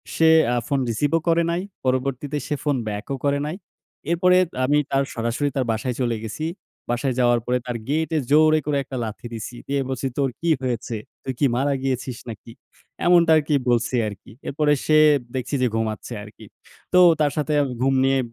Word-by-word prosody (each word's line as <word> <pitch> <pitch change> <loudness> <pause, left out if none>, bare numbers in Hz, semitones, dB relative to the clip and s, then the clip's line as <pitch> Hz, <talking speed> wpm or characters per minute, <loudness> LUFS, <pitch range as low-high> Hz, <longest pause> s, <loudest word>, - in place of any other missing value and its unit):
সে 160 0 +5 0.2
অ্যা 120 - +1
phone 140 - +1
receive 145 +7 0
ও - - 0
করে 170 0 +3
নাই। 170 +1 -1 0.2
পরবর্তীতে 135 +3 -1
সে 150 - -1
ফোন 145 -2 +1
back 105 0 -4
ও - - -1
করে 140 0 +2
নাই। 155 +4 -3 0.6
এরপরে 180 +1 +4 0.3
আমি 145 +3 +3
তার 135 0 +2
সরাসরি 120 +5 -1
তার 130 -2 0
বাসায় 115 +2 -2
চলে 120 -2 0
গেছি। 115 +8 -4 0.5
বাসায় 125 +2 0
যাওয়ার 120 -1 +4
পরে 125 0 +1
তার 120 -2 -3
gate 160 +3 0
এ - - +3
জোরে 155 +1 +5
করে 145 -1 0
একটা 135 - -7
লাথি 110 +1 -7
দিছি। 115 +2 -6
দিয়ে 140 0 0
বলছি, 130 0 -2
"তোর 140 -2 +2
কি 170 - 0
হয়েছে? 120 -2 -3 0.3
তুই 130 - -3
কি 145 - +3
মারা 140 +3 +1
গিয়েছিস 130 -2 -2
নাকি?" 115 +1 -9 0.5
এমনটা 175 -2 +5
আরকি 150 0 0 0.2
বলছি 120 +1 +1
আরকি। 100 -2 -9 0.2
এরপরে 150 +1 +2
সে 155 - +4 0.4
দেখছি 130 +2 -2
যে 125 - +3
ঘুমাচ্ছে, 110 -1 -3
আরকি। 105 0 -13 0.5
তো 180 - +6 0.2
তার 150 -2 +2
সাথে 150 0 -1
আমি 130 - -3
ঘুম 135 0 +3
নিয়ে 135 0 +3
135 Hz, 195 wpm, -23 LUFS, 120-150 Hz, 0.6 s, তো